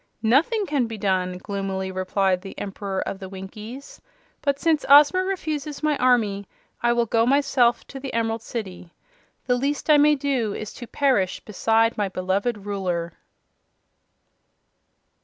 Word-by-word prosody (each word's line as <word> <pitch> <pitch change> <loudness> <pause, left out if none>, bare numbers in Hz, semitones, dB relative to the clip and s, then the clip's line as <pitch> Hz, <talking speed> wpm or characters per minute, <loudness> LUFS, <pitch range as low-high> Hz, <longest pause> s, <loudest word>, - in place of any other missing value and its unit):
"Nothing 330 - +3
can 285 -8 0
be 225 -1 -6
done!" 185 -2 0
gloomily 190 -1 -4
replied 185 0 0
the 195 0 -10
Emperor 195 -1 -4
of 190 - -4
the 190 -1 -8
Winkies. 210 +7 -9 0.4
"But 280 -2 0
since 315 0 +1
Ozma 295 +6 +7
refuses 310 -6 -4
my 305 -1 +2
army 215 -6 +2 0.3
I 240 - +3
will 240 0 +2
go 225 0 +2
myself 265 -2 +2
to 270 - -9
the 270 0 -6
Emerald 225 0 -1
City. 190 -7 -7 0.5
The 250 -1 +2
least 285 +4 0
I 300 - +7
may 295 +1 +5
do 265 -7 -1
is 215 - -6
to 240 - -9
perish 250 -11 +1
beside 225 +2 +1
my 205 -2 0
beloved 195 +4 -2
Ruler." 180 -4 -2
225 Hz, 145 wpm, -24 LUFS, 195-275 Hz, 0.5 s, Ozma